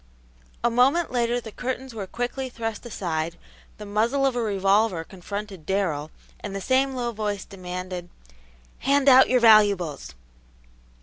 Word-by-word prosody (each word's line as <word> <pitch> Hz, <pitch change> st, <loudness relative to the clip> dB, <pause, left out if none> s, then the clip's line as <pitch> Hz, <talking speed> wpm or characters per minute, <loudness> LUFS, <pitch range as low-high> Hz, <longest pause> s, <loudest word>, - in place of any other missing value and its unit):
A 240 Hz, -, +3 dB
moment 270 Hz, +8 st, +3 dB
later 240 Hz, -1 st, +1 dB
the 225 Hz, -2 st, -9 dB
curtains 260 Hz, +2 st, -5 dB
were 205 Hz, -4 st, -5 dB
quickly 245 Hz, +4 st, -4 dB
thrust 225 Hz, -1 st, -5 dB
aside, 170 Hz, -6 st, -3 dB, 0.4 s
the 210 Hz, -, -8 dB
muzzle 230 Hz, +7 st, +1 dB
of 265 Hz, -2 st, +1 dB
a 240 Hz, -, 0 dB
revolver 200 Hz, -3 st, +1 dB
confronted 195 Hz, +1 st, -7 dB
Darrell, 165 Hz, -5 st, -1 dB, 0.3 s
and 205 Hz, -1 st, -6 dB
the -, -, -2 dB
same 265 Hz, +5 st, +1 dB
low 240 Hz, -1 st, -2 dB
voice 210 Hz, -3 st, -3 dB
demanded, 180 Hz, -2 st, -6 dB, 0.7 s
"Hand 280 Hz, +1 st, +2 dB
out 260 Hz, -1 st, +8 dB
your 255 Hz, -, +4 dB
valuables!" 200 Hz, -, +4 dB
215 Hz, 140 wpm, -25 LUFS, 190-245 Hz, 0.7 s, out